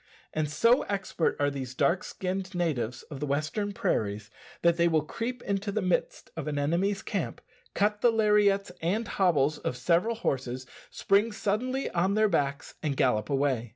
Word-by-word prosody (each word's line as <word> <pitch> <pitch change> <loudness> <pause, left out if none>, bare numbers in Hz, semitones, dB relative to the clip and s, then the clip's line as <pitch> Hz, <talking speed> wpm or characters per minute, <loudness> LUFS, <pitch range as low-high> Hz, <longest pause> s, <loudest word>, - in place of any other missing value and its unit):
And 155 -1 -1
so 230 - +4
expert 195 -4 0
are 145 0 +2
these 130 -2 -6
dark 175 +7 +2
skinned 190 0 -4
natives 125 -9 -1
of 140 - -9
the 150 - -3
western 155 +9 -1
prairies, 105 - -1 0.3
that 170 -1 +5
they 170 0 +3
will 160 -3 +2
creep 235 +9 -4
into 200 +1 -1
the 215 - 0
midst 180 -1 -1
of 160 -2 -5
an 150 -1 -2
enemy's 180 +8 0
camp, - - -3 0.4
cut 210 +1 +1
the 240 - +6
lariats 210 -3 +3
and 205 +7 0
hobbles 155 -6 +2
of 125 - -3
several 175 - +2
horses, 130 - -2 0.2
spring 205 +3 +2
suddenly 240 +6 -1
on 185 +3 +1
their 215 0 +4
backs, 140 -5 -1
and 145 -3 -2
gallop 105 -4 +2
away. 135 -4 0
170 Hz, 170 wpm, -28 LUFS, 140-205 Hz, 0.4 s, the